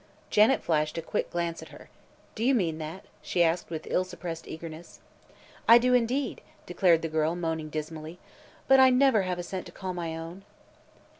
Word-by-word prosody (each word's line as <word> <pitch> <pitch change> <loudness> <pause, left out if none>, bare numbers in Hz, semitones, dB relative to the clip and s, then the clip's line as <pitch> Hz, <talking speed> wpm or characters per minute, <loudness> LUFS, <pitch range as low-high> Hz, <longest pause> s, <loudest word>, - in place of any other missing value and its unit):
Janet 215 +6 +4
flashed 155 -1 0
a - - -1
quick - - -2
glance 170 -1 -3
at - - -10
her. - - -14 0.4
"Do 220 - -4
you 265 +2 +4
mean 165 -8 0
that?" 160 +4 -7 0.2
she 175 - +1
asked 170 +1 0
with 160 -2 -5
ill 185 - +1
suppressed 175 -3 -7
eagerness. 160 +1 -9 0.7
"I 230 - +10
do, 250 +1 +2
indeed," 250 +2 0 0.2
declared 175 -2 +3
the - - 0
girl, 160 +1 0
moaning 160 -3 -3
dismally; 155 +2 -6 0.5
"but 270 0 +6
I 260 0 +8
never 255 -3 +4
have 185 -1 -2
a 175 - -4
cent 185 +1 -6
to - - -11
call 185 -1 -5
my 165 -2 -4
own." 165 +4 -8
175 Hz, 190 wpm, -28 LUFS, 160-210 Hz, 0.7 s, I